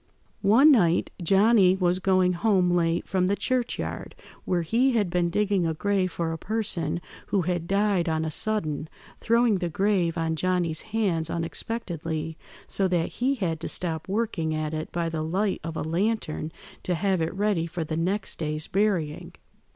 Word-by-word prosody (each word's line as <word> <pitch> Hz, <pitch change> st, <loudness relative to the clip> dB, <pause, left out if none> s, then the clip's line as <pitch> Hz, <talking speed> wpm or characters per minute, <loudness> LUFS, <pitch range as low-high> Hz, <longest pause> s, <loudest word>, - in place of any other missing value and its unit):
"One 235 Hz, +10 st, +6 dB
night 175 Hz, -, +3 dB
Johnny 195 Hz, +1 st, +5 dB
was 180 Hz, -1 st, +1 dB
going 185 Hz, -1 st, +3 dB
home 185 Hz, -1 st, +2 dB
late 170 Hz, -1 st, +1 dB
from 185 Hz, -1 st, +1 dB
the 200 Hz, -, +2 dB
churchyard, 250 Hz, +2 st, -2 dB, 0.3 s
where 175 Hz, -2 st, 0 dB
he 245 Hz, +10 st, +2 dB
had 205 Hz, -6 st, +1 dB
been 175 Hz, -1 st, +1 dB
digging 200 Hz, -2 st, +1 dB
a 160 Hz, -, -1 dB
grave 195 Hz, 0 st, 0 dB
for 165 Hz, -1 st, -2 dB
a 165 Hz, -, -6 dB
person 175 Hz, -7 st, -2 dB, 0.3 s
who 195 Hz, -3 st, +1 dB
had 175 Hz, -1 st, -2 dB
died 195 Hz, -3 st, +1 dB
on 160 Hz, 0 st, 0 dB
a 160 Hz, -, -3 dB
sudden, 155 Hz, -6 st, -1 dB, 0.3 s
throwing 230 Hz, -3 st, +3 dB
the 175 Hz, -2 st, -2 dB
grave 180 Hz, -1 st, +1 dB
on 165 Hz, 0 st, 0 dB
Johnny's 175 Hz, -2 st, 0 dB
hands 195 Hz, -8 st, -1 dB
unexpectedly, 165 Hz, -3 st, -4 dB, 0.3 s
so 195 Hz, -, 0 dB
that 175 Hz, -3 st, 0 dB
he 265 Hz, +3 st, 0 dB
had 170 Hz, -, -2 dB
to -, -, -4 dB
stop 160 Hz, -3 st, -2 dB
working 195 Hz, -7 st, -1 dB
at 155 Hz, 0 st, -2 dB
it 155 Hz, 0 st, -4 dB
by 170 Hz, -1 st, -1 dB
the 160 Hz, -1 st, -3 dB
light 190 Hz, +5 st, -1 dB
of 165 Hz, -1 st, -5 dB
a -, -, -2 dB
lantern 165 Hz, -2 st, -1 dB, 0.3 s
to 180 Hz, -, -1 dB
have 190 Hz, +1 st, 0 dB
it 160 Hz, -, 0 dB
ready 195 Hz, -4 st, 0 dB
for 170 Hz, 0 st, -4 dB
the 155 Hz, 0 st, -4 dB
next 190 Hz, +5 st, -1 dB
day's 155 Hz, -1 st, -2 dB
burying. 185 Hz, -7 st, -1 dB
180 Hz, 175 wpm, -26 LUFS, 165-205 Hz, 0.3 s, One